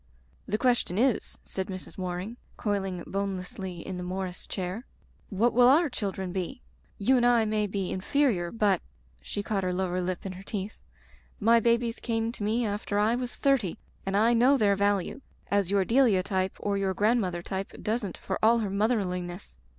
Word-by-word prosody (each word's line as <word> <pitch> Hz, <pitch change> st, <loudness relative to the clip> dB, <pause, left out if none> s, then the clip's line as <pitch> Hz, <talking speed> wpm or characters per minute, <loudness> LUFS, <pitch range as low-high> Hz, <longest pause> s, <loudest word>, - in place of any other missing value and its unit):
"The 215 Hz, -, 0 dB
question 240 Hz, -7 st, +1 dB
is/* 250 Hz, 0 st, +1 dB
said 190 Hz, -1 st, -4 dB
Mrs. 185 Hz, -1 st, -7 dB
Waring, 185 Hz, +5 st, -4 dB, 0.2 s
coil 205 Hz, -3 st, 0 dB
ing 180 Hz, -2 st, -4 dB
bonelessly 190 Hz, -2 st, -4 dB
in 185 Hz, -, -4 dB
the 180 Hz, -, -4 dB
Morris 185 Hz, 0 st, -4 dB
chair, 185 Hz, +4 st, -4 dB, 0.5 s
"what 225 Hz, +4 st, +2 dB
will 245 Hz, +1 st, +6 dB
our 295 Hz, +3 st, +5 dB
children 190 Hz, -5 st, -3 dB
be? 195 Hz, +7 st, -4 dB, 0.3 s
You 255 Hz, +6 st, +3 dB
and 240 Hz, -, +2 dB
I 240 Hz, -2 st, +4 dB
may 215 Hz, -1 st, +1 dB
be 195 Hz, -2 st, -2 dB
in 185 Hz, -, -3 dB
ferior, 220 Hz, -9 st, +1 dB
but,'* 205 Hz, -5 st, +2 dB, 0.4 s
she 205 Hz, -, -4 dB
caught 200 Hz, -2 st, -1 dB
her 185 Hz, -, 0 dB
lower 180 Hz, 0 st, -1 dB
lip 180 Hz, +1 st, -3 dB
in 195 Hz, -, -3 dB
her 185 Hz, +1 st, -9 dB
teeth, 200 Hz, +1 st, -5 dB, 0.6 s
"my 230 Hz, +2 st, +5 dB
babies 235 Hz, 0 st, +1 dB
came 225 Hz, -1 st, -1 dB
to 235 Hz, -, -10 dB
me 225 Hz, +3 st, +1 dB
after 205 Hz, 0 st, -2 dB
I 210 Hz, +2 st, +3 dB
was 245 Hz, 0 st, -3 dB
thirty, 260 Hz, -11 st, +1 dB, 0.3 s
and 195 Hz, +1 st, 0 dB
I 225 Hz, +3 st, +4 dB
know 250 Hz, +4 st, +5 dB
their 205 Hz, -4 st, +3 dB
value, 200 Hz, +5 st, 0 dB, 0.3 s
as 200 Hz, -3 st, +2 dB
your 200 Hz, -1 st, +2 dB
De 250 Hz, +7 st, +4 dB
lia 200 Hz, -8 st, +4 dB
type 190 Hz, 0 st, -1 dB
or 200 Hz, -1 st, -1 dB
your 190 Hz, -1 st, 0 dB
grandmother 205 Hz, -6 st, +1 dB
type 190 Hz, +1 st, -4 dB
doesn't 215 Hz, -4 st, -2 dB
for 190 Hz, -, -4 dB
all 230 Hz, +2 st, +5 dB
her 210 Hz, -4 st, -1 dB
motherliness. 190 Hz, -, -1 dB
200 Hz, 190 wpm, -28 LUFS, 185-230 Hz, 0.6 s, will